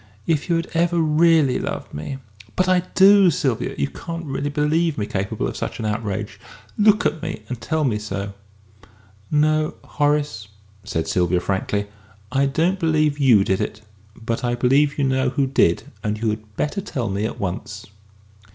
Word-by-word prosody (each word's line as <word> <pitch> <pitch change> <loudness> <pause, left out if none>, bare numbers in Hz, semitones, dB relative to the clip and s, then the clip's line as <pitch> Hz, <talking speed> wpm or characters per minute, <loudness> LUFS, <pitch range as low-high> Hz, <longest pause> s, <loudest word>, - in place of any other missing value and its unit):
If 160 -1 0
you 170 - +3
had 165 - 0
ever 170 +1 +2
really 155 -3 +4
loved - - -5
me 80 - -5 0.2
!" 105 +1 -20
"But 185 - +2
I 185 -1 +4 0.2
do, 195 0 +7
Sylvia, 135 -6 -1
you 70 - 0
can't 165 - -7
really 140 0 -2
believe 150 +2 +1
me 105 - -1
capable 100 0 -2
of - - -5
such - - -4
an 110 - -4
outrage! 105 -2 -3 0.4
Look 210 0 +4
at 160 - 0
me - - -5
and 125 -1 -6
tell 160 -1 -1
me 115 -7 +1
so." 100 -1 -5 1.0
"No, 155 +1 +2
Horace," 145 -7 0 0.4
said 80 -5 -3
Sylvia 90 0 +1
frankly. 100 +2 -1 0.5
"I 140 +1 +2
don't 170 +7 +1
believe 155 -3 +1
you 120 -8 +5
did 95 -1 0
it. 110 - -4 0.3
But 115 +2 -4
I 120 0 0
believe 135 +4 +2
you 140 - +1
know 130 -1 +2
who 135 +2 0
did. 130 -10 +2 0.2
And 105 0 -1
you 110 -1 +1
had 105 -1 -8
better 175 +7 -1
tell 130 - -3
me 100 +1 -1
at - - -5
once!" 100 +2 -5
135 Hz, 180 wpm, -22 LUFS, 105-155 Hz, 1.0 s, do